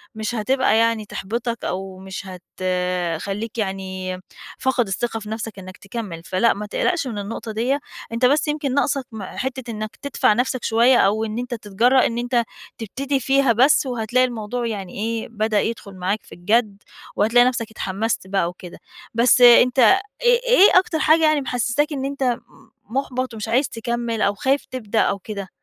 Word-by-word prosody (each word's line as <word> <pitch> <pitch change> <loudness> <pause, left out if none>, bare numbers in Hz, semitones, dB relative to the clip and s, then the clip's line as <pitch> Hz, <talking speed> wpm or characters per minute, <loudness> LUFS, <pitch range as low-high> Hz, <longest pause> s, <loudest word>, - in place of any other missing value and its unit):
مش 220 +2 -3
هتبقى 240 +1 +2
يعني 230 -1 +2
تحبطك، 230 +4 -4
أو 190 0 -4
مش 190 +1 -7 0.3
هتخليك 185 +3 -2
يعني 190 -3 -3 0.4
فاقد 260 -4 +1
الثقة 225 +4 -2
في 215 -1 -9
نفسك 220 -2 -5
إنك 185 +1 -10
تكمل، 195 -5 -6
فلأ 190 +5 +2
ما 210 +1 -6
تقلقش 330 - -1
من 225 -4 -5
النقطة 220 +2 -5
ديّة. 245 +6 0 0.3
أنت 235 +2 +2
بس 290 +5 +3
يمكن 295 -3 -1
ناقصك 275 -2 +1
م 215 -3 -7
حتة 260 +3 -5
إنك 215 0 -6
تدفع 280 -6 +2
نفسك 245 +2 -1
شوية، 235 +3 +4
أو 215 +2 +2
إن 220 +1 -5
أنت 245 0 -4
تتجرأ 235 +4 +2
إن 230 - -4
أنت 240 0 +1 0.3
تبتدي 270 +5 -2
فيها 270 -1 +3
بس، 265 +5 +4
وهتلاقي 245 0 +1
الموضوع 240 0 -3
يعني 195 -5 -5
إيه 225 +2 -3
بدأ 215 -2 +1
يدخل 215 -4 -5
معاك 190 +4 -2
في - - -13
الجَد، 205 +3 0 0.3
وهتلاقي 240 +4 +4
نَفسك 235 -3 -2
اتحمست 215 0 -2
بقى 190 -3 0
وكده. 180 0 -11 0.3
بس 240 +3 +4
أنت 245 +1 +7 0.4
إيه 485 0 +5
إيه 410 -6 +7
أكتر 330 -4 -2
حاجة 320 +1 +4
يعني 310 -2 +3
محسساك 255 +4 0
إن 270 -1 -3
أنت 275 -1 -3
م 245 -1 +1 0.5
مُحبَط 255 -1 -2
ومش 215 +1 -5
عايز 255 +5 +1
تكمّل، 235 -1 -3
أو 200 - +2
خايف 270 +6 0
تبدأ، 230 -4 -2
أو 200 - 0
كده؟ 200 -1 -7
230 Hz, 170 wpm, -21 LUFS, 205-255 Hz, 0.5 s, أنت